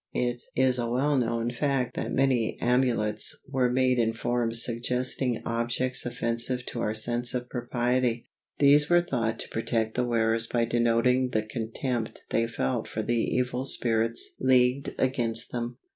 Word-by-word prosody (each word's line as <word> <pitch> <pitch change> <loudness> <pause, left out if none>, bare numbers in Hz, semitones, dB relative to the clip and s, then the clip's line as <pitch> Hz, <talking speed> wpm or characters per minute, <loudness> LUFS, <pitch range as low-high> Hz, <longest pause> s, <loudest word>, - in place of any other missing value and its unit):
It 120 -1 -1
is 130 -1 +2
a 120 -1 -1
well 140 +5 +1
known 115 -2 0
fact 130 -1 -1
that - - -3
many 130 -4 +1
amulets 120 -4 +1
were 130 -2 +1
made 130 0 +2
in 115 -1 +1
forms 115 0 0
suggesting 125 0 -1
objects 120 +2 0
offensive 120 +1 -1
to 120 - -5
our 105 -1 -1
sense 120 +3 +1
of 125 0 -3
propriety. 120 -1 -1 0.3
These 145 +1 +5
were 175 0 +5
thought 115 -9 -2
to - - -4
protect 110 -1 -1
the 125 - 0
wearers 115 -1 +1
by 120 -1 0
denoting 120 +2 +2
the 110 - +1
contempt 115 +1 -4
they 115 0 +1
felt 65 - -2
for - - -4
the 120 - -1
evil 125 +2 -1
spirits 115 -2 +1
leagued 130 +1 +2
against 120 -3 -1
them. 120 0 -4
120 Hz, 155 wpm, -27 LUFS, 115-125 Hz, 0.3 s, These